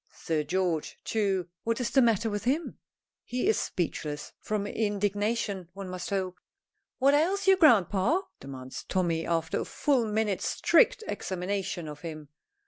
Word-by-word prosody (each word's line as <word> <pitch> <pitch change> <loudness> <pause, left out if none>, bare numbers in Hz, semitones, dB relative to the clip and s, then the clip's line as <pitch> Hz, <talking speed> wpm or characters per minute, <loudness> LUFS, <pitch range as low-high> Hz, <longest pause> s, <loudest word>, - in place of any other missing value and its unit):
Sir 155 -2 -1
George, 180 -3 -1
too, 195 -5 0 0.2
what 230 +1 0
is 245 - -1
the 270 - +5
matter 230 -2 +3
with 205 0 -3
him? 290 +7 -1 0.4
He 250 0 -2
is 220 - +3
speechless 150 -4 -3
from 210 -1 -2
indignation 205 -2 -1
one 195 -1 -7
must 180 -1 -5
hope. 185 -2 -2 0.6
"What 275 +1 +4
ails 360 +7 +2
you, 385 0 +7
grandpa?" 240 - +4 0.2
demands 130 -1 -8
Tommy, 170 -3 0
after 165 -1 0
a - - -3
full 260 -6 +1
minute's 210 -2 0
strict - - +3
examination 185 -2 -3
of 150 -1 -8
him. 155 -3 -7
200 Hz, 145 wpm, -28 LUFS, 175-230 Hz, 0.6 s, you